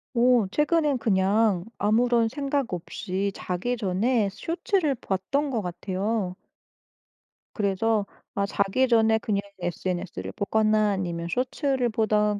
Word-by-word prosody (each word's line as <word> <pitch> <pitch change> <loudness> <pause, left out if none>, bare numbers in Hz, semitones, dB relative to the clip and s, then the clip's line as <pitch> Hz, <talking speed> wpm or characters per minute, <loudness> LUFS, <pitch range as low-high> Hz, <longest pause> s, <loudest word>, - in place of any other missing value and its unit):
오 240 -3 +4
최근에는 300 0 +2
그냥 200 -3 +2
아무런 230 +2 +3
생각 275 -2 -2
없이 190 +3 -3
자기 195 +8 -2
전에 210 +2 +1
쇼츠를 330 - 0
봤던 255 +8 -1
것 230 -4 0
같아요. 185 +2 -2 1.2
그래서 210 +1 +1 0.3
아 200 - +1
자기 200 +6 +1
전에 225 -2 +4
그냥 205 -2 -1 0.2
SNS를 175 +1 -3
보거나 215 0 +2
아니면 170 -3 -3
쇼츠를 255 - 0
보던 210 -1 +1
215 Hz, 250 characters per minute, -26 LUFS, 195-245 Hz, 1.2 s, 오